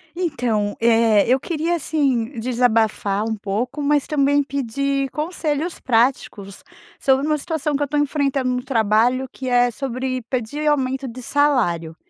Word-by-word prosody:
Então, 240 - -1
eh, 225 -2 +4
eu 255 +3 +3
queria, 335 +3 -1
assim, 275 -6 -1
desabafar 225 -4 +1
um 225 0 -2
pouco, 220 +8 -3
mas 290 0 +2
também 285 -1 +2
pedir 275 +1 -2
conselhos 310 +1 -3
práticos 225 -5 0 0.4
sobre 270 +1 +2
uma 305 0 +1
situação 300 -1 -2
que 280 - -2
eu 290 - +1
tô 295 +2 -2
enfrentando 280 -3 0
no 250 0 -2
trabalho 240 +1 +2
que 260 -1 -6
é 245 0 +3
sobre 255 0 -3
pedir 260 +5 -2
aumento 265 -2 0
de 250 +1 -8
salário. 220 - +1
260 Hz, 145 wpm, -21 LUFS, 230-285 Hz, 0.4 s, eh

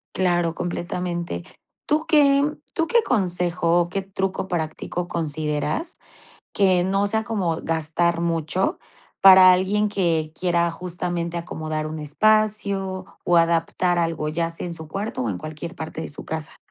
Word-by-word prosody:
Claro, 175 -3 +1
completamente. 175 - -3 0.4
¿Tú 310 +2 +1
qué 285 -3 +5 0.3
tú 330 0 0
qué 470 +6 +4
consejo, 180 - +1
o 175 - -2
qué 195 +2 -2
truco 190 0 -3
práctico 170 +1 -3
consideras, 155 - -2 0.6
que 185 -3 +3
no 195 +2 +1
sea 220 +2 +1
como 190 -8 -1
gastar 165 +1 0
mucho, 170 +2 -1 0.4
para 190 -1 +9
alguien 200 +3 +2
que 165 -6 0
quiera 175 -1 +2
justamente 175 -1 -3
acomodar 155 -2 -4
un 155 +1 -5
espacio 200 +2 +1 0.2
o 175 - +3
adaptar 170 +1 +2
algo?, 165 -2 -1
ya 165 +2 -1
sea 165 - -5
en 170 - -5
su 160 -2 -8
cuarto, 195 -1 -3
o 115 - -1
en 90 - -4
cualquier 155 - -7
parte 160 -1 -6
de 160 - -5
su 145 - -7
casa. 160 -1 -6
175 Hz, 145 wpm, -23 LUFS, 160-190 Hz, 0.6 s, para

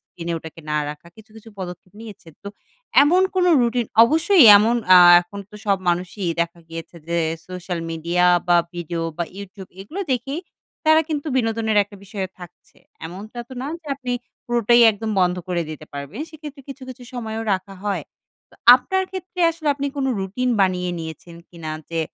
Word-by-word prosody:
screen 170 -1 -10
এ - - 0
ওটাকে 160 0 -11
না 150 - 0
রাখা, 150 +3 -12
কিছু, 220 0 -17
কিছু 220 +1 -13
পদক্ষেপ 180 0 -8
নিয়েছেন। 205 -7 -12
তো 200 - -5 0.5
এমন 355 +6 +4
কোন 370 -1 +2 0.2
রুটিন 240 -1 0 0.2
অবশ্যই 325 - +5
এমন 225 +4 +3 0.2
আ - - +10 0.2
এখন 175 +3 -10
তো - - -16
সব 200 - +3
মানুষই 180 +2 -1
দেখা 170 +1 -2
গিয়েছে 165 +1 -9
যে, 170 - -1 0.3
সোশ্যাল 180 -1 -5
মিডিয়া 170 +2 0 0.2
বা 175 - +5 0.2
ভিডিও 170 -1 -4 0.2
বা 170 - 0
YouTube 195 -1 -10
এগুলা 330 - -5
দেখেই 275 +5 -3 0.4
তারা 315 0 +6
কিন্তু 300 -1 -3
বিনোদনের 225 -2 0
একটা 205 0 -12
বিষয়ে 195 -1 -5
থাকছে। 180 -1 -15 0.3
এমনটা 205 +7 -10
তো - - -12
না 265 - -4
যে, 315 - -23
আপনি 255 -2 -4 0.3
পুরোটাই 240 0 +3
একদম 220 +1 -5
বন্ধ 180 0 +2
করে 175 -1 0
দিতে 155 -1 -9
পারবেন। 140 - -7
সেক্ষেত্রে 295 -3 -10
কিছু, 275 0 -9
কিছু 255 0 -10
সময়ও 225 -2 -4
রাখা 190 +1 -7
হয়। 205 -1 -1 0.5
তো - - -21 0.2
আপনার 380 +9 0
ক্ষেত্রে 370 -1 -7
আসলে, 320 -2 -4
আপনি 280 0 -3
কোনো 270 -1 0
রুটিন 210 +7 -2
বানিয়ে 180 -1 +1
নিয়েছেন 165 +1 -9
কিনা? 160 -3 -7 0.2
যে 165 -1 -1
200 Hz, 175 wpm, -21 LUFS, 175-255 Hz, 0.5 s, আ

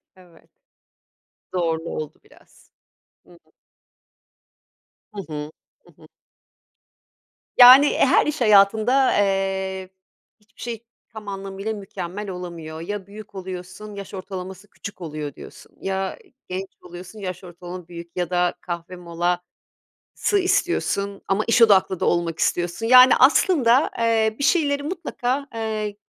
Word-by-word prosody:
Evet. 180 -3 -21 1.0
Doğru, 165 -3 0
oldu 155 -2 -6
biraz. - - -23 0.6
Hı - - -19
hı. 170 - -23 1.6
Hı 205 - -5
hı. 150 0 -5 0.3
Hı - - -21
hı. - - -16 1.5
Yani, 260 +4 +9
her 270 - +4
iş 300 -2 -3
hayatında, 220 +5 +4
eee, 190 -1 -1 0.5
hiçbir 210 0 -20
şey 235 -2 -5 0.3
tam 215 -2 -10
anlamıyla 195 +2 -5
mükemmel 200 0 -6
olamıyor. 170 -3 -7
Ya, 195 +2 -5
büyük 210 0 -12
oluyorsun, 185 +2 -8
yaş 200 0 -9
ortalaması 190 0 -7
küçük 200 -2 -10
oluyor 155 -3 -5
diyorsun, - - -14
ya, 190 0 -3 0.3
genç 190 +1 -4
oluyorsun, 180 +4 -11
yaş 185 -2 -6
ortalama 175 0 -9
büyük 170 -1 -10
ya 175 -1 -1
da 180 -1 +1
kahve 175 +1 -6
molası 175 0 -3 0.8
istiyorsun 200 - 0
ama 195 +3 +1
iş 230 0 +4
odaklı 190 -4 +4
da - - 0
olmak 170 -2 0
istiyorsun. 175 +6 -1
Yani, 255 +1 +8
aslında, 265 -2 +4
eee, 225 -1 +1
bir 280 - -2
şeyleri 285 -4 +2
mutlaka, 285 -5 -3
eee, 215 -2 -3
195 Hz, 120 wpm, -22 LUFS, 180-220 Hz, 1.6 s, Yani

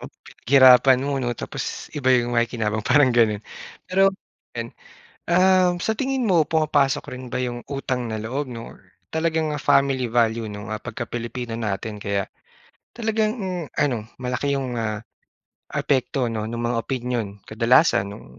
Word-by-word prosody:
Pinaghirapan 130 0 +4
mo 140 -1 -1
'no 120 -2 -2
tapos - - -6
iba 140 -4 -1
'yong 120 -2 +3
makikinabang 115 -2 0
parang 130 +2 +4
gano'n. 110 -3 +2 0.4
Pero 195 +1 +4 0.5
'yan, - - -4 0.6
um, 185 0 +4
sa 205 +5 -1
tingin 265 +1 -1
mo 175 -7 +3
pumapasok 150 -4 +2
rin 125 0 -7
ba - - -4
'yong 120 -1 -4
utang 130 -3 -3
na 110 - -3
loob 130 +6 -3
'no 115 -1 -8
or - - -19 0.3
talagang 160 -1 0
family 135 -3 +2
value 115 -1 +1
'no, 105 +1 -7
ah, 110 - -4
pagka 115 +1 -5
Pilipino 120 +1 -5
natin 105 0 -3
kaya 100 -1 -1 0.7
talagang 220 -2 0 0.5
ano 140 -5 +2 0.2
malaki 125 +3 -1
'yong, 130 -3 -2
ah, 110 -2 -2 0.7
apekto 130 -1 0
'no 110 -2 -3
ng 115 +2 -4
mga 120 0 -1
opinyon. 125 -4 -2 0.2
Kadalasan 115 - +3
no'ng 105 - -11
125 Hz, 145 wpm, -23 LUFS, 115-145 Hz, 0.7 s, Pinaghirapan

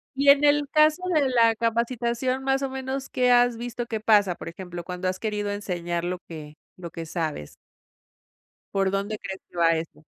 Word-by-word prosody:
Y 280 +1 +3
en 280 +1 +7
el 290 0 +4
caso 305 +2 +4
de 290 -3 +3
la 230 -2 +4
capacitación, 235 +3 -1
¿más 270 0 +1
o 275 - -1
menos 265 0 -4
qué 250 -1 +2
has 245 -1 +4
visto, 240 0 -5
qué 225 -1 -3
pasa? 205 -4 +3
Por - - -9
ejemplo, 175 0 -7
cuando 180 +1 -4
has 185 0 -2
querido 210 -2 -2
enseñar 175 -4 -3
lo 180 +1 -3
que 155 -3 -9 0.2
lo 175 -2 -7
que 165 0 -6
sabes. 155 - -4 1.2
¿Por 195 -1 +2
dónde 200 +2 -2
crees 190 0 -6
que - - -20
va 170 -1 +4
eso? 160 -1 -7
215 Hz, 190 wpm, -25 LUFS, 180-255 Hz, 1.2 s, en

